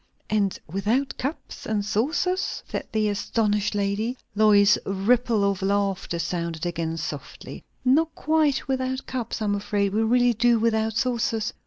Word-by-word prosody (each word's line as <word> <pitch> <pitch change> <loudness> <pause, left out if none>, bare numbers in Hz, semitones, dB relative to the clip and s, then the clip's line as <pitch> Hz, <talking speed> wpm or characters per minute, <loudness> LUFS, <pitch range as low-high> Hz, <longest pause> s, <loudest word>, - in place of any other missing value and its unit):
"And 205 -3 +1
without 210 - -1
cups 280 +5 -5
and 210 -2 -1
saucers?" 315 - -1
said - - -4
the 215 -1 +1
astonished 210 0 0
lady. 205 +5 -1 0.2
Lois's 210 -1 +5
"ripple 220 +3 +1
of 200 -1 0
laughter" 195 -3 0
sounded 170 -1 -3
again 165 -1 -2
softly. 150 -2 -7 0.2
"Not 310 +5 +3
quite 310 -3 +1
without 260 0 -2
cups; 235 -3 -4
I - - 0
am 205 - +1
afraid 200 -1 -1
we 215 - +2
really 245 +2 +3
do 235 +1 +3
without 220 -1 +1
saucers. 235 -2 0
215 Hz, 145 wpm, -25 LUFS, 200-245 Hz, 0.2 s, Lois's